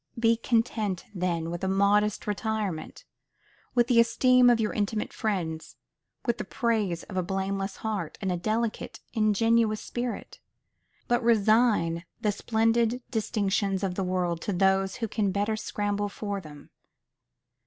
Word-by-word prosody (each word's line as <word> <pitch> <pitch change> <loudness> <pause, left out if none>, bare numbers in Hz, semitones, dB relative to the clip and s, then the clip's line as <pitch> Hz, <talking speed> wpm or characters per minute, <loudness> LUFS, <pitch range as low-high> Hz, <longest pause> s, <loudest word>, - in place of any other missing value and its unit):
Be 230 0 +4
content 225 -5 0
then 170 -3 -1
with 175 +2 -5
a - - +1
modest 200 +2 +2
retirement, 210 - -3 0.7
with 240 -1 +5
the 245 -1 +4
esteem 250 +2 +5
of 240 -1 +4
your 215 -1 0
intimate 210 +1 -2
friends, 170 -7 -3 0.5
with 235 -2 0
the - - -2
praises 215 -8 -1
of 190 - -7
a - - +3
blameless 195 +1 -2
heart, 200 -8 -3
and 190 - -1
a - - 0
delicate, 215 +5 -2
ingenuous 220 0 +2
spirit; 240 -1 -5 0.7
but 240 +1 +2
resign 215 -6 +3 0.2
the 210 - +1
splendid 225 +3 +1
distinctions 200 -3 0
of 190 -2 0
the 195 - -2
world 180 -2 -1
to 205 - -2
those 190 +1 +2
who 225 - -3
can 205 -2 0
better 205 +3 0
scramble 205 -1 -2
for 200 -1 -4
them. 150 -3 -13
210 Hz, 145 wpm, -27 LUFS, 190-225 Hz, 0.7 s, with